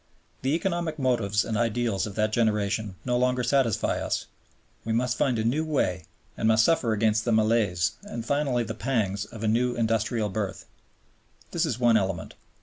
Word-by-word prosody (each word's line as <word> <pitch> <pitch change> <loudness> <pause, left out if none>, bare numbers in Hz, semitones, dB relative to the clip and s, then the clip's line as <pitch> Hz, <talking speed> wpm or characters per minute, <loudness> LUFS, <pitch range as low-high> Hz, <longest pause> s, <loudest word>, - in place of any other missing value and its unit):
The 135 +4 +1
economic 170 -2 -2
motives 115 -6 +1
and 115 - -2
ideals 115 -2 0
of 100 - -8
that 110 0 0
generation 105 -3 0
no 125 0 +1
longer 125 0 +1
satisfy 125 -3 +1
us: - - -2 0.6
we 115 - -2
must 125 +2 +1
find 125 -3 +1
a 110 - 0
new 130 +8 +1
way 95 - -1 0.3
and - - 0
must 110 0 +5
suffer 150 -8 +2
again 110 0 +2
the 120 - 0
malaise, 105 -6 +2
and 115 -1 -7
finally 140 -3 +1
the 110 - -5
pangs, 105 -5 -1
of 110 +1 -10
a - - +1
new 120 +3 +1
industrial 115 -1 0
birth. 100 0 -4 0.9
This - - 0
is - - -2
one 120 -2 +4
element. 95 -4 -2
115 Hz, 175 wpm, -26 LUFS, 105-125 Hz, 0.9 s, must